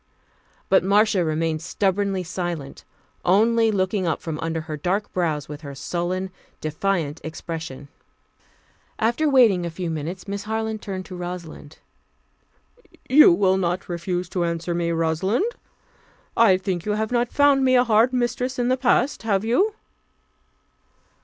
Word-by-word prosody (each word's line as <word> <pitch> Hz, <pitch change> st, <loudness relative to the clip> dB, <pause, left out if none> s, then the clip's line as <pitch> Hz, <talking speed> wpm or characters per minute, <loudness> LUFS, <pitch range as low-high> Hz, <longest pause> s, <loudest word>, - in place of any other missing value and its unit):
But 190 Hz, -, +4 dB
Marcia 200 Hz, 0 st, +3 dB
remained 160 Hz, 0 st, -1 dB
stubbornly 195 Hz, +1 st, 0 dB
silent, 175 Hz, -5 st, -5 dB, 0.4 s
only 225 Hz, +5 st, +3 dB
looking 190 Hz, -2 st, 0 dB
up 160 Hz, -, 0 dB
from 160 Hz, -2 st, -5 dB
under 165 Hz, 0 st, -2 dB
her 155 Hz, -1 st, -6 dB
dark 185 Hz, +7 st, -2 dB
brows 155 Hz, -5 st, -1 dB
with 150 Hz, 0 st, -8 dB
her 140 Hz, -3 st, -8 dB
sullen, 180 Hz, +7 st, -3 dB, 0.3 s
defiant 160 Hz, -1 st, -2 dB
expression. 160 Hz, -3 st, -6 dB, 1.1 s
After 240 Hz, +7 st, +1 dB
waiting 230 Hz, -10 st, +5 dB
a 170 Hz, -, -2 dB
few 170 Hz, 0 st, -4 dB
minutes, 160 Hz, +5 st, -5 dB
Miss 200 Hz, 0 st, -4 dB
Harland 220 Hz, 0 st, -3 dB
turned 190 Hz, -2 st, -5 dB
to 185 Hz, -, -9 dB
Rosalind. 175 Hz, -4 st, -7 dB, 1.3 s
"You 295 Hz, -3 st, +8 dB
will 190 Hz, +1 st, +3 dB
not 180 Hz, -1 st, -1 dB
refuse 175 Hz, +1 st, -3 dB
to 180 Hz, -, -1 dB
answer 170 Hz, 0 st, -2 dB
me, 170 Hz, 0 st, -1 dB
Rosalind? 165 Hz, -, 0 dB, 0.9 s
I 215 Hz, -5 st, +5 dB
think 185 Hz, -2 st, -3 dB
you 210 Hz, -, +1 dB
have 220 Hz, +2 st, -2 dB
not 240 Hz, -1 st, +1 dB
found 285 Hz, -2 st, +4 dB
me 255 Hz, 0 st, +4 dB
a 245 Hz, -, +6 dB
hard 230 Hz, +1 st, +3 dB
mistress 250 Hz, +1 st, -1 dB
in 245 Hz, 0 st, 0 dB
the 255 Hz, -, +2 dB
past, 255 Hz, +2 st, +1 dB
have 210 Hz, -2 st, 0 dB
you?" 385 Hz, -, +2 dB
185 Hz, 145 wpm, -23 LUFS, 165-220 Hz, 1.3 s, You